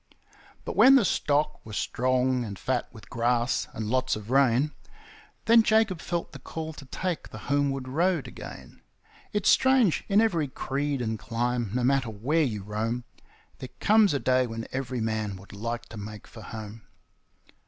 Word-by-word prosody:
But - - -4
when 270 +1 +8
the 250 -7 +5
stock 150 -3 0
were 110 - -10
strong 130 +2 +1
and 100 -4 -6
fat 125 +2 -2
with 110 - -14
grass 120 +1 +1
and 110 - -5
lots 130 +3 +1
of 105 +2 -8
rain, 135 +1 +3 0.7
Then 230 0 +7
Jacob 220 -5 +2
felt 170 -1 -3
the - - -10
call 160 0 -6
to 145 - -11
take 175 +5 -4
the - - -9 0.2
homeward 135 -2 0
road 165 +3 +1
again. - - -10 0.5
It's 210 -2 -1
strange 260 -9 +4
in 200 0 +4
every 175 -10 +2
creed 140 0 -2
and 110 -1 -2
clime, 120 +1 -1
no 125 - 0
matter 135 -1 +2
where 125 +10 0
you 110 -9 -1
roam, 110 +4 -2 0.6
There 130 - -7
comes 210 -6 +4
a - - +1
day 130 +1 +2
when 115 0 -6
every 130 -2 -3
man 110 -2 -2
would 95 +1 -13
like 115 +3 -4
to 110 - -9
make 105 +1 -8
for 110 - -12
home. 110 0 -8
130 Hz, 170 wpm, -27 LUFS, 115-155 Hz, 0.7 s, when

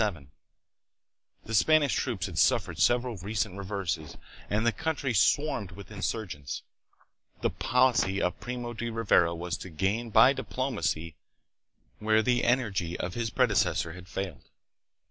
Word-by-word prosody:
The 115 - -6
Spanish 145 +5 +4
troops 110 -9 -1
had - - -4
suffered - - +2
several 120 -2 +2
recent 100 +1 -2
reverses 95 -6 -4 0.3
and 110 +2 +1
the 115 - +4
country 140 +2 -2
swarmed 105 -2 +2
with 100 +3 -11
insurgents. 100 -8 -4 0.8
The - - +1
policy 125 -6 +2
of 90 - -1
Primo 120 -1 -5
de 115 +1 -4
Rivera 100 -7 +2
was 90 +2 -3
to 95 - -9
gain 100 +8 -1
by 115 +5 +6
diplomacy 85 - -2 0.8
where 110 +1 +3
the 120 +1 +2
energy 105 -9 0
of 90 0 -3
his 115 +1 -2
predecessor 80 -5 +1
had 90 +1 -11
failed. 95 -5 -6
105 Hz, 130 wpm, -29 LUFS, 90-120 Hz, 0.8 s, by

